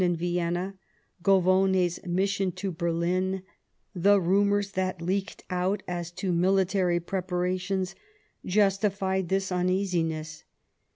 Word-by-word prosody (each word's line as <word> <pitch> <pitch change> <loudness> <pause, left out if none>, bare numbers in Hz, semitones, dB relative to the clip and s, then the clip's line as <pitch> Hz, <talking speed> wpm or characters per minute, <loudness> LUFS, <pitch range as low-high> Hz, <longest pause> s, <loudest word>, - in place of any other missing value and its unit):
nd 175 -1 +2
Vienna, 175 +2 -1 0.5
Govone's 185 -1 +3
mission 190 +1 0
to 190 +2 -4
Berlin, 180 +3 -1 0.5
the 200 +3 +4
rumours 200 +2 +2
that 185 -2 -2
leaked 190 +5 -2
out 185 +2 0
as 175 -1 -3
to 180 +1 -2
military 185 0 +2
preparations, 185 +1 -2 0.5
justified 195 -2 +1
this 190 0 0
uneasiness. 175 -4 -1
185 Hz, 100 wpm, -27 LUFS, 175-195 Hz, 0.5 s, the